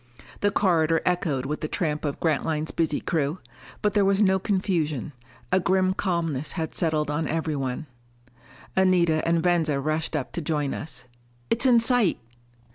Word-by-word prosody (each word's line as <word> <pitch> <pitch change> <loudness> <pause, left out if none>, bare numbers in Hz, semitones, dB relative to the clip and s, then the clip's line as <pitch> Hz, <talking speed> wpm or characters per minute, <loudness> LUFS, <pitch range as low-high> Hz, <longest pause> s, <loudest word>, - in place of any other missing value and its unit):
The 205 - +2
corridor 165 -5 +2
echoed 160 -7 0
with 150 +2 -3
the 155 - -1
tramp 155 -3 -2
of 145 - -3
Grantline's 155 0 0
busy 160 -3 0
crew. 155 0 -1 0.5
But 210 - +2
there 205 - +3
was 195 0 +2
no 190 -2 +4
confusion; 170 - -1 0.4
a 185 - +4
grim 185 +1 +2
calmness 165 -7 -2
had 160 -3 -3
settled 155 -3 0
on 155 +1 -1
everyone. 150 -3 -2 0.9
Anita 175 -4 +3
and 165 -1 +2
Venza 165 -5 +2
rushed 155 +3 -1
up 140 -4 -3
to 175 - -4
join 150 -3 -1
us. 125 -5 -6 0.5
"It's 230 +3 +3
in 240 -2 +6
sight!" 230 -5 +3
165 Hz, 155 wpm, -25 LUFS, 150-185 Hz, 0.9 s, in